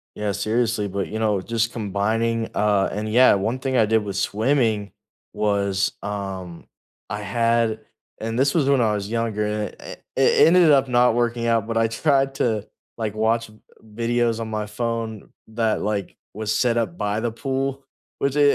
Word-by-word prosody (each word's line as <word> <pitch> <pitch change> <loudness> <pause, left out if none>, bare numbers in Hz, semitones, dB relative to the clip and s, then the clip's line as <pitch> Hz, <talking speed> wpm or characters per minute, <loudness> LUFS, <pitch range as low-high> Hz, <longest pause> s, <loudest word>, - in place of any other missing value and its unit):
Yeah, 105 -1 -2
seriously, 110 +1 0
but, 100 0 -3
you 110 - -4
know, 105 -3 +1
just 115 +3 -1
combining, 115 +2 -1
uh 105 -1 +2
And 105 +1 -3
yeah, 125 -2 +6
one 110 +6 -1
thing 130 -1 -1
I 110 - +5
did 110 0 +2
with 100 -2 -5
swimming 110 -1 +1 0.4
was, 100 -2 0
um 95 -4 -6 0.4
I 105 0 -4
had 115 0 +1 0.4
and 115 +1 -3
this 135 +2 +2
was 150 -5 +2
when 140 -2 +4
I 110 -2 +2
was 100 -1 -3
younger, 115 -2 -1
a 105 0 -3 0.2
i - - -7 0.2
it 135 +3 +5
ended 170 -2 +6
up 135 -2 +4
not 125 -1 +4
working 120 0 0
out, 115 -2 +1
but 115 -1 -2
I 115 0 +3
tried 135 +3 +1
to, 110 -5 -1 0.3
like, 110 -3 -2
watch, 110 +1 0
uh, - - -18 0.3
videos 115 +1 0
on 115 - -4
my 105 -1 -2
phone 115 0 -4 0.2
that, 110 -1 0
like, 100 -3 -3 0.2
was 110 +1 -1
set 120 -2 +2
up 105 -8 -1
by 105 +1 -1
the 120 0 -1
pool, 135 +2 -3 0.3
which 140 0 -1
it 150 - +3
110 Hz, 180 wpm, -23 LUFS, 105-120 Hz, 0.4 s, yeah